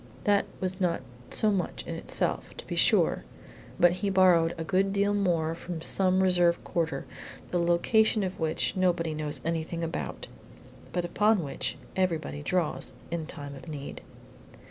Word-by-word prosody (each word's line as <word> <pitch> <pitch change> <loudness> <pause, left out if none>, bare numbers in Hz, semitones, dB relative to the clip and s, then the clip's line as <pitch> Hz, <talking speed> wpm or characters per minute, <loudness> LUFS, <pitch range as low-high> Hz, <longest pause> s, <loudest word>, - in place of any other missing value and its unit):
That 205 -1 +3
was 185 +1 -2
not 175 -5 +1 0.3
so 215 - +2
much 185 -4 -2
in - - -4
itself, - - -2
to - - -8
be - - -4
sure, - - +3 0.6
but 175 0 +6
he 190 +3 -1
borrowed 180 -3 +4
a 165 - -3
good 190 +4 +1
deal 200 +1 +2
more 170 -5 +1
from 170 0 -6
some 185 +1 +3
reserve 175 -2 +3
quarter, 160 -5 -2 0.5
the 175 - +1
location 205 +6 +3
of 185 0 -4
which 160 -1 -1
nobody 175 -3 +1
knows 150 -3 -4
anything 165 +1 -2
about, 165 0 -4 0.7
but 175 -1 -1
upon 210 +1 +2
which 140 - -3 0.2
everybody 165 -5 -1
draws 170 +2 -1 0.2
in 165 -2 -3
time 145 -4 -7
of 135 +4 -11
need. 145 -3 -6
175 Hz, 155 wpm, -28 LUFS, 160-190 Hz, 0.7 s, but